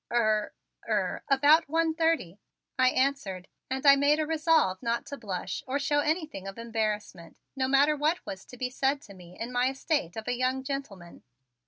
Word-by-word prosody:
"Er 215 -3 +1 0.4
er, 205 -4 0
about 290 +3 +5
one 325 +1 +1
thirty," 320 - 0 0.4
I 255 -1 +4
answered, 255 -10 -1 0.2
and 265 +2 -3
I 280 0 +9
made 285 +2 +3
a 310 - +1
resolve 315 - +2
not 235 -1 -1
to 280 - -7
blush 190 -4 -5
or 265 +2 0
show 290 +1 +1
anything 305 - -2
of 195 - -7
embarrassment, 215 -7 -3 0.2
no 260 -1 0
matter 280 +3 +4
what 305 +4 0
was 190 - -7
to 250 - -13
be 250 0 -3
said 270 +2 0
to 200 - -13
me 180 -1 -14
in 230 +2 -4
my 250 +1 +2
estate 270 - -2
of 220 - -6
a 245 - +1
young 255 +1 -1
gentleman. 240 -11 -6
260 Hz, 185 wpm, -28 LUFS, 210-290 Hz, 0.4 s, I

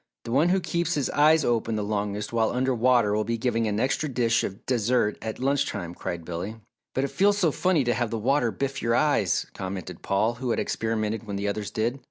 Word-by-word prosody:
"The 115 - -6
one 145 +8 +3
who 190 +1 +3
keeps 170 -1 -1
his 145 -3 -1
eyes 155 +1 +4
open 115 -1 0
the 105 - -1
longest 105 +1 -2
while 115 -1 +2
under 130 +1 0
water 120 -3 +3
will 105 +1 +1
be 115 +1 -2
given 115 -1 0
an 105 0 -1
extra 140 +5 0
dish 120 -3 +1
of 95 - -6
dessert 120 -3 +1
at 110 -1 -4
lunch 135 +2 +1
time," 90 -4 -5
cried 85 -1 -5
Billy. 90 +6 -4 0.4
"But 130 - +1
it 140 - -1
feels 200 +8 +3
so 175 -6 +3
funny 180 -2 +2
to 120 -1 +1
have 120 -2 -1
the 115 - -2
water 125 +2 +2
biff 135 +5 -3
your 115 0 +1
eyes," 125 - +2
commented 95 -2 -6
Paul, 105 +4 +1
who 130 - -2
had - - +1
experimented 110 0 -2
when 100 - -4
the 100 +1 -2
others 100 0 -2
did. 115 +5 -1
115 Hz, 230 wpm, -26 LUFS, 105-135 Hz, 0.4 s, eyes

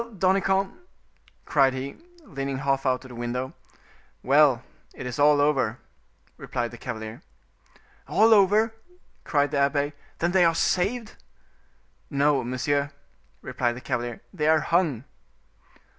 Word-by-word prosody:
Danicamp?" 190 +1 +2 0.7
cried 135 -3 +3
he, 135 +2 -5 0.3
leaning 135 - -4
half 135 0 0
out 130 +1 0
of - - -11
the - - -10
window. 120 +2 -4 0.7
"Well, 135 -2 +4 0.3
it - - -7
is 125 +2 -5
all 145 0 +5
over," 135 -6 +1 0.6
replied 120 -1 -3
the 120 - -11
cavalier. 110 -2 -6 0.9
"All 225 +2 +5
over!" 210 +2 +4 0.5
cried 145 -1 +1
the 145 - 0
abbe. 140 +1 +1 0.2
"Then 170 +1 0
they 185 -1 +4
are 165 -1 +3
saved?" 215 +7 0 0.9
"No, 140 -2 +2
monsieur," 140 +4 -1 0.5
replied 125 -2 -1
the - - -7
cavalier, 120 -2 -3
"they 155 -5 -1
are 160 0 +4
hung." 165 -9 +1
140 Hz, 130 wpm, -25 LUFS, 130-170 Hz, 0.9 s, all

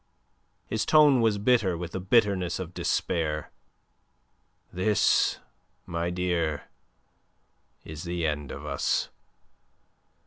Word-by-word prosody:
His 110 0 -2
tone 150 -5 +5
was 110 -2 +2
bitter 105 -5 +2
with 85 0 -6
the 95 - -4
bitterness 95 -3 +2
of 90 -2 -7
despair. 75 -4 -1 1.2
"This, 100 +4 +2 0.5
my 85 0 -2
dear, 85 -4 -1 1.2
is 80 0 -8
the 85 -1 -3
end 75 -3 -2
of 75 - -8
us. 70 -2 -1
90 Hz, 100 wpm, -27 LUFS, 80-105 Hz, 1.2 s, tone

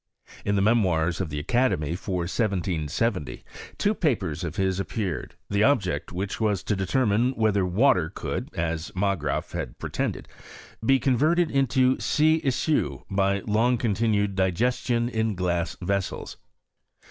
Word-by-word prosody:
In 100 - 0
the 100 - +2
Memoirs 90 -6 +2
of 90 - -3
the 75 - -4
Academy, 85 - +1
for 90 -1 -3
1770t 90 - -1 0.3
two 205 - +2
papers 110 - -1
of 80 - -4
his 95 -1 0
appeared, 95 -3 -3
(he 100 0 0
object 100 - +2
of - - -11
which 95 +4 -3
was 105 -4 +1
to 105 - 0
determine 115 +5 +1
whether 105 -5 +1
water 90 - +3
could, - - -4
as 80 -1 -2
Margraaf 95 -7 -1
had - - -5
pretended, - - -3 0.6
be 135 +4 +4
converted 155 +6 +2
into 130 -1 +3
siiica 155 -1 +1
by 100 0 +1
long 115 +4 +2
continued 105 -3 +1
digesdou 120 +6 +1
in 110 -2 0
glass 85 -2 -1
vessels. 100 +1 -2
100 Hz, 135 wpm, -25 LUFS, 90-120 Hz, 0.6 s, be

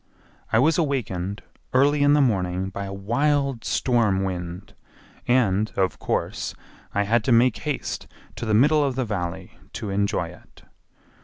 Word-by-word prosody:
I - - +4
was 155 +7 +3
awakened 100 - -2 0.3
early 145 +3 +4
in 145 0 +5
the 150 - +5
morning 95 -6 0
by 100 +1 -5
a 95 - -6
wild 135 +5 0
storm 110 -7 +1
wind 90 -1 -5 0.5
and 110 -4 +2
of 95 -1 0
course - - -2 0.4
I 100 - +1
had 110 +2 +2
to 130 - +2
make 120 0 +4
haste 150 -2 -4 0.3
to 115 +1 -4
the 110 - +2
middle 150 +6 +5
of 135 -3 -1
the 130 -1 -1
Valley 95 -3 -5
to 105 - -4
enjoy 100 -4 0
it. 90 - -17
110 Hz, 155 wpm, -24 LUFS, 95-135 Hz, 0.5 s, in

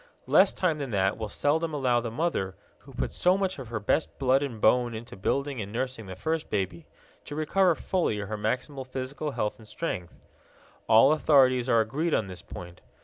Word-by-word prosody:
Less - - +5
time 165 -5 0
than 140 -2 -3
that 95 -2 +1
will 110 -2 -5
seldom 155 +6 0
allow 125 -4 +2
the 115 - -4
mother, 115 - -1 0.2
who - - -16
put - - -3
so 180 +2 +3
much 190 -4 -1
of 130 - -7
her 110 -1 -3
best 105 +9 0
blood 135 0 +3
and 130 -6 -4
bone 120 +1 +3
into 115 +2 -8
building 135 +6 -1
and 100 0 -6
nursing 125 -2 -3
the 95 - -7
first 160 - -2
baby, 95 -5 -3 0.4
to 145 - -7
recover 170 +3 +2
fully 175 - -1
her 105 +1 -4
maximal 125 +6 -2
physical 130 +3 -4
health 105 -6 -2
and 110 - -14
strength. 90 - -5 0.6
All 115 +5 +7
authorities 130 -5 +4
are 115 -2 +5
agreed 150 +9 0
on 110 - 0
this 90 -2 -8
point. 90 0 -10
125 Hz, 195 wpm, -27 LUFS, 105-150 Hz, 0.6 s, All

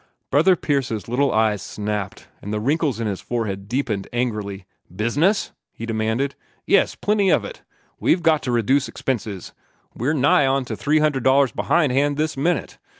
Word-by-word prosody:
Brother 170 +6 +5
Pierce's 135 - -2
little 135 +4 +1
eyes 110 -2 +2
snapped, 105 -2 -5
and 105 - -6
the 105 - -1
wrinkles 140 0 0
in 115 - -2
his 100 -3 -3
forehead 100 -5 -3
deepened 115 -5 -2
angrily. 105 -6 -3 0.3
"Business?" 145 - +1 0.2
he 115 - -7
demanded. 115 +5 -1 0.3
"Yes, 200 - +3
plenty 205 -2 +1
of - - +3
it. - - -9 0.4
We've 175 - +2
got 160 -3 +3
to 125 - -2
reduce 125 +3 +2
expenses. 110 -5 -4 0.4
We're 130 +7 -1
nigh 140 0 +4
onto 135 -1 0
$300 140 -3 +2
behind 155 -6 +2
hand 145 +2 +1
this 155 0 -1
minute. 165 +6 -1
130 Hz, 150 wpm, -22 LUFS, 110-145 Hz, 0.4 s, Brother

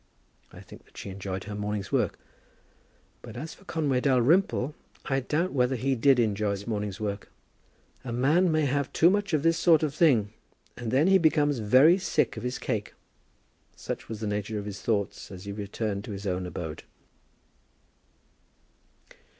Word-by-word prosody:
I - - -12
think - - -14
that - - -22
she 100 - -6
enjoyed 95 0 -5
her 105 - -7
morning's 105 -1 -4
work. - - 0 1.0
But - - -10
as 155 +5 -6
for 195 - -19
Conway 145 -8 0
Dalrymple, 140 - +2 0.3
I 135 -1 0
doubt 155 +7 -1
whether 130 -1 +2
he 135 +3 0
did 130 +2 +4
enjoy 105 -3 +1
his 100 0 -3
morning's 105 -2 -3
work. 100 -2 -4 0.7
"A 125 - -5
man 150 +9 +3
may 155 -1 +2
have 140 0 -1
too 170 +3 +5
much 200 -1 0
of 155 -3 +1
this 165 0 +3
sort 160 -3 +5
of 150 -3 0
thing, 120 -11 +3 0.4
and 120 -2 -5
then 135 +6 +3
he 190 +1 +5
becomes 150 -4 +2
very 130 - +5
sick 190 - 0
of - - -6
his 125 +1 -3
cake." 110 -5 -3 0.8
Such - - -6
was 110 -1 -6
the - - -2
nature 105 +1 -2
of 100 - -5
his 100 -1 -7
thoughts 105 -3 -2
as 95 0 -10
he 100 - -5
returned 100 0 -4
to 105 - -6
his 100 +1 -7
own 90 -1 -2
abode. 80 -3 -6
125 Hz, 175 wpm, -27 LUFS, 105-150 Hz, 1.0 s, too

